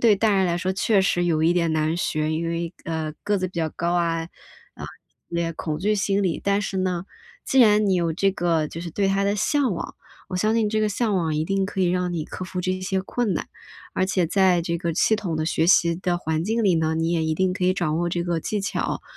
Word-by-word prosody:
对 220 -4 +5
大 215 0 +2
人 190 -1 +3
来 170 -1 0
说 185 +1 -1
确 195 +2 +2
实 175 -2 +1
有 160 -2 +1
一 165 - +4
点 170 -2 +1
难 155 +1 +1
学， 155 -3 -1
因 165 +1 -2
为， 170 +1 -3
呃， 160 -2 -3
个 205 0 +1
子 185 - -1
比 - - -20
较 160 -1 0
高 170 +3 -2
啊， 165 -2 +1 0.5
啊， - - -8 0.5
也 170 -1 -1
恐 155 -1 -4
惧 210 +4 +1
心 200 0 +1
理， 175 -4 -1
但 200 +1 +1
是 190 -1 -3
呢， 180 -1 -1 0.4
既 270 - +1
然 210 -2 +5
你 190 - +3
有 170 -2 +1
这 195 +3 +2
个， 170 -5 0
就 165 - -7
是 170 -1 -6
对 195 +4 0
它 195 +1 +1
的 200 +1 +1
向 270 0 +1
往， - - -6 0.3
我 185 - -3
相 215 +4 +1
信 220 -2 +2
这 215 0 +1
个 215 - +2
向 210 +1 0
往 160 -3 0
一 155 - 0
定 195 +2 0
可 195 -1 -4
以 180 - +3
让 180 -1 -1
你 155 -3 -2
克 185 - -7
服 180 0 -4
这 185 +1 -2
些 190 0 -1
困 220 +1 -1
难。 - - -4 0.5
而 185 - +1
且 185 -3 +1
在 185 0 +3
这 170 0 -1
个 170 -1 -2
系 220 - +3
统 185 -7 -3
的 155 - -1
学 160 0 +1
习 170 -2 +5
的 180 0 -1
环 160 -1 -2
境 225 +3 0
里 185 -4 +4
呢， 160 0 +1
你 165 +1 0
也 165 -2 +1
一 160 0 0
定 185 +2 +1
可 185 0 -2
以 185 +1 +3
掌 160 -4 -1
握 175 - 0
这 175 0 -1
个 170 -2 -1
技 210 +4 -2
巧。 200 - -2
180 Hz, 280 characters per minute, -23 LUFS, 165-195 Hz, 0.5 s, 对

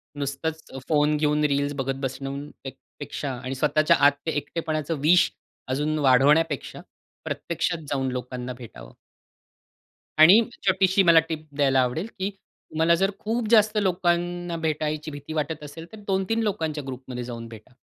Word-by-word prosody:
नुसतंच 145 +3 -3 0.3
फोन 150 -1 +3
घेऊन 150 0 +1
रील्स 140 +1 0
बघत 135 -1 -2
बसणून 135 +2 -4 0.5
पेक्षा 140 -2 -4
आणि 130 +1 -4
स्वतःच्या 155 +2 +3
आत - - +5
ते 160 - 0
एकटेपणाचं 155 0 -3
विष 170 +4 +5 0.4
अजून 150 +4 -1
वाढवण्यापेक्षा, 145 +3 +3 0.4
प्रत्यक्षात 170 -1 -3
जाऊन 135 -2 0
लोकांना 125 0 -5
भेटावं 120 -2 -12 1.3
आणि 185 +9 +9 0.3
छोटीशी 190 +1 +4
मला 170 -2 +7
टिप 155 -1 -5
द्यायला 135 -2 +3
आवडेल, 140 - -1
की 195 +2 -1
तुम्हाला 170 -4 -1
जर 195 +3 +1
खूप 225 +1 -2
जास्त 215 -1 +5
लोकांना 175 -2 0
भेटायची 155 -1 -2
भीती 145 +2 -8
वाटत 150 0 -3
असेल, 150 +3 -9
तर 220 - -10
2-3 195 +3 0
लोकांच्या 160 -8 -2
ग्रुप 130 0 -6
मध्ये 125 -1 -4
जाऊन 115 -1 -7
भेटा. 115 +2 -13
155 Hz, 140 wpm, -25 LUFS, 135-170 Hz, 1.3 s, आणि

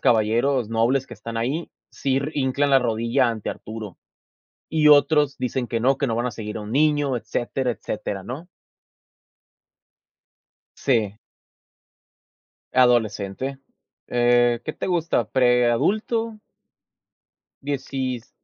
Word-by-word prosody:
caballeros 115 +2 +2
nobles 120 +4 +1
que 120 - -10
están 115 +2 -7
ahí 135 +9 -2 0.2
sir 135 +2 -1
hincan 140 +1 +1
la 135 - +6
rodilla 120 +2 +1
ante 110 -3 -3
Arturo. 110 -4 -8 0.7
Y 155 -1 +3
otros 150 -1 +5
dicen 125 0 -2
que 115 - -1
no, 130 +3 +3
que 140 - 0
no 115 - 0
van 120 +1 0
a - - -1
seguir 105 0 -6
a - - -4
un 105 +1 -7
niño, 145 -1 +2
etcétera, 120 +3 -2
etcétera, 105 -3 -5
¿no? 145 +8 -7 2.3
Sí. 110 -5 0 1.5
Adolescente. 120 0 +1 0.5
Eh, 120 -1 +3
¿qué - - -3
te - - -5
gusta? 170 - 0
¿Preadulto? 135 - +2 1.2
16, 130 -3 -3
125 Hz, 115 wpm, -23 LUFS, 115-140 Hz, 2.3 s, la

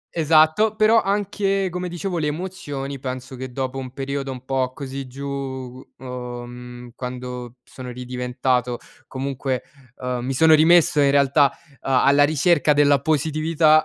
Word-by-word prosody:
Esatto, 160 +7 +4
però 220 +1 +5
anche, 195 -1 0
come 180 +1 -4
dicevo, 175 0 -3
le 150 - 0
emozioni 145 -5 -5
penso 130 0 -6
che, 130 0 -7
dopo 130 +1 -3
un 130 -1 -7
periodo 135 0 -4
un 130 -1 -9
po' 130 -1 0
così 135 0 -6
giù, 135 +3 -8 0.7
uhm, 125 -1 -8
quando 125 -1 -6
sono 130 -1 -10
ridiventato 125 0 -2 0.3
comunque 135 -1 -3 0.3
uhm 125 -1 -4
mi 130 +2 -2
sono 160 +2 +6
rimesso 160 -1 +5
in 140 - +4
realtà, 140 0 +4 0.3
uhm, 135 - -3
alla 140 +2 +5
ricerca 155 +1 +3
della 145 -1 +4
positività, 155 +1 +3
140 Hz, 140 wpm, -22 LUFS, 125-155 Hz, 0.7 s, sono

